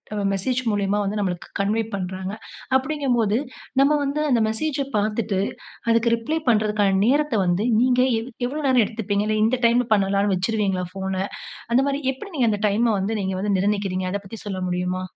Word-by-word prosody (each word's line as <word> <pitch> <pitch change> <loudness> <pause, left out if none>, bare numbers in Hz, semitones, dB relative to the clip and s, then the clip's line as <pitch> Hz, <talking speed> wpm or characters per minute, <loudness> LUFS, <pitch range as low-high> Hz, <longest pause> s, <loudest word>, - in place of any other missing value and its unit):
அ - - -3 0.2
message 245 +7 -1
மூலியமா 205 0 0
வந்து 210 +2 -2
நமளுக்கு 180 -3 -3
கன்வே 210 +3 +1
பண்றாங்க. 190 0 -4 0.4
அப்டிங்கபோது 260 -6 0 0.4
நம்ம 280 +2 +4
வந்து 285 +2 -1
அந்த 240 - +4
மெசேஜ 275 +7 -2 0.2
பார்த்துட்டு 210 -1 0 0.5
அதுக்கு 230 0 +3
ரிப்ளை 265 +8 -2
பண்றதுக்கான 210 -3 +2
நேரத்த 290 0 +2
வந்து 175 +3 +1 0.2
நீங்க 250 +1 +3 0.2
எவ் 230 +3 -7 0.2
எவ்வளோ 295 +4 -4
நேரம் 255 -3 +5
எடுத்துப்பீங்க. 205 -2 -2
இல்ல 215 0 +1
இந்த 235 +3 +2
டைம்ல 240 +1 +2
பண்ணலாம்ன்னு 200 -1 +2
வச்சுருவீங்களா 195 -2 0
ஃபோன. 190 0 -4 0.6
அந்த 245 - +5
மாரி 280 0 -1
எப்டி 320 +10 -10
நீங்க 245 -4 +3
அந்த 205 - -2
டைம 215 +4 +2
வந்து 195 +3 -1
நீங்க 190 0 -2
வந்து 205 +1 0
நிர்ணயிக்கிறீங்க. 195 -2 0
அத 200 - -1
பத்தி 220 +3 -9
சொல்ல 195 -2 -3
முடியுமா? 180 +1 -2
210 Hz, 170 wpm, -23 LUFS, 195-245 Hz, 0.6 s, நேரம்